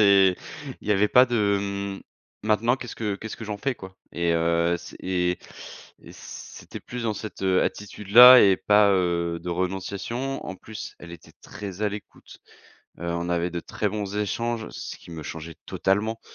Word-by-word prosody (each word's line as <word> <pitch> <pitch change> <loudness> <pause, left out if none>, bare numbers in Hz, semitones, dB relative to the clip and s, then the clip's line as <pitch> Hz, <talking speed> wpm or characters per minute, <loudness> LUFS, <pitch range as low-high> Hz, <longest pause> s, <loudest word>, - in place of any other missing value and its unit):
c'est, 95 -3 +6 0.4
il - - -10
y - - +5
avait 105 +1 +3
pas 125 +4 +7
de: 105 -5 +2 0.4
«M - - -12 0.4
maintenant 110 +4 +2
qu'est-ce 125 -3 -8
que 105 -3 -2
qu'est 110 +2 -8
ce - - -6
que 115 - -6
j'en 105 -1 -4
fais 130 +5 -2
quoi?» 95 -4 -12 0.2
Et, 85 0 0
heu, 85 +1 +2
c - - -11
et 90 -1 0 0.6
et - - -13
c'était - - -10
plus 125 -1 -6
dans 110 -2 0
cette, 105 -1 -8
heu, 95 -1 +3
attitude 105 0 -5
là 125 +3 +11
et 95 -2 +5
pas, 105 0 +5
heu, 85 -2 0
de 90 - -7
renonciation. 100 +9 -3
En 95 - -5
plus 110 +2 -9
elle 85 - -11
était 85 - -13
très 100 -2 -8
à 105 - +3
l'écoute. 105 0 -10 0.6
Heu, - - -5
on 85 0 -2
avait 85 0 0
de 85 0 -4
très 105 - -2
bons 100 -1 -4
échanges, 115 +2 -2
ce - - -7
qui - - -15
me 80 -2 -7
changeait 80 +1 -7
totalement. 110 +4 0
100 Hz, 190 wpm, -25 LUFS, 90-110 Hz, 0.6 s, là